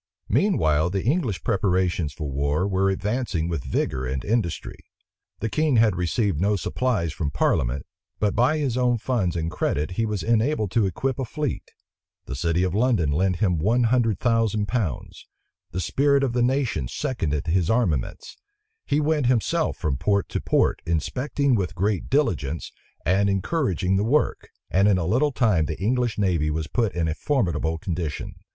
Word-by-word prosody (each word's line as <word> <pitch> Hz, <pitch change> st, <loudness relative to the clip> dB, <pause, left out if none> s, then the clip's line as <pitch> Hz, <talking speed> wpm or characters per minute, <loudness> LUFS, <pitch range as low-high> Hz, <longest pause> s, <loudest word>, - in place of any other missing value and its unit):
Meanwhile 80 Hz, -, +2 dB
the 95 Hz, +1 st, -2 dB
English 125 Hz, -, 0 dB
preparations 90 Hz, -, +1 dB
for 75 Hz, +2 st, -6 dB
war 70 Hz, +6 st, 0 dB
were 95 Hz, 0 st, +1 dB
advancing 95 Hz, -3 st, -1 dB
with 80 Hz, -6 st, -3 dB
vigor 65 Hz, -1 st, -1 dB
and 65 Hz, +1 st, -3 dB
industry. 105 Hz, -6 st, -2 dB, 0.6 s
The 110 Hz, -, 0 dB
king 150 Hz, +4 st, +1 dB
had 110 Hz, -4 st, +4 dB
received 90 Hz, 0 st, 0 dB
no 105 Hz, +2 st, +2 dB
supplies 100 Hz, -, -1 dB
from 75 Hz, -3 st, -2 dB
parliament; 65 Hz, -2 st, 0 dB, 0.3 s
but 105 Hz, -2 st, +1 dB
by 130 Hz, +6 st, +3 dB
his 135 Hz, -5 st, -1 dB
own 125 Hz, -1 st, +2 dB
funds 110 Hz, -7 st, -1 dB
and 80 Hz, 0 st, -2 dB
credit 75 Hz, +5 st, -1 dB
he 115 Hz, +5 st, -1 dB
was 105 Hz, -4 st, -3 dB
enabled 115 Hz, -2 st, +1 dB
to 110 Hz, -2 st, +2 dB
equip 130 Hz, +9 st, -2 dB
a -, -, 0 dB
fleet: 145 Hz, +1 st, -4 dB, 0.6 s
the -, -, -6 dB
city 85 Hz, +5 st, 0 dB
of 90 Hz, -2 st, 0 dB
London 105 Hz, -, +2 dB
lent 90 Hz, +5 st, +1 dB
him 90 Hz, -3 st, +1 dB
one 115 Hz, +9 st, +2 dB
hundred 115 Hz, -6 st, +2 dB
thousand 115 Hz, -3 st, +1 dB
pounds: 105 Hz, -, -3 dB, 0.4 s
the 90 Hz, -, -4 dB
spirit 140 Hz, -, +2 dB
of 130 Hz, -3 st, 0 dB
the 125 Hz, -, +1 dB
nation 125 Hz, -, 0 dB
seconded 75 Hz, -, -2 dB
his 85 Hz, 0 st, +1 dB
armaments: 100 Hz, -, -1 dB, 0.5 s
he -, -, +1 dB
himself 150 Hz, 0 st, +1 dB
went -, -, -27 dB
from 75 Hz, -6 st, 0 dB
port 100 Hz, +5 st, +1 dB
to -, -, -2 dB
port, -, -, +1 dB
inspecting 130 Hz, -, 0 dB
with 100 Hz, -6 st, -1 dB
great 100 Hz, 0 st, -1 dB
diligence, 85 Hz, -, 0 dB, 0.3 s
and 100 Hz, +3 st, +3 dB
encouraging 95 Hz, -, 0 dB
the 100 Hz, -, +1 dB
work; 140 Hz, +7 st, 0 dB, 0.2 s
and 100 Hz, +2 st, +4 dB
in 100 Hz, -3 st, +4 dB
a 85 Hz, -, -1 dB
little 130 Hz, -, +2 dB
time 105 Hz, -, +2 dB
the 80 Hz, +1 st, -4 dB
English 120 Hz, +3 st, 0 dB
navy 90 Hz, -7 st, +1 dB
was 80 Hz, +1 st, -2 dB
put 115 Hz, +6 st, 0 dB
in 85 Hz, -2 st, 0 dB
a 80 Hz, -, 0 dB
formidable 85 Hz, -, 0 dB
condition. 80 Hz, -3 st, -4 dB
100 Hz, 170 wpm, -24 LUFS, 85-120 Hz, 0.6 s, had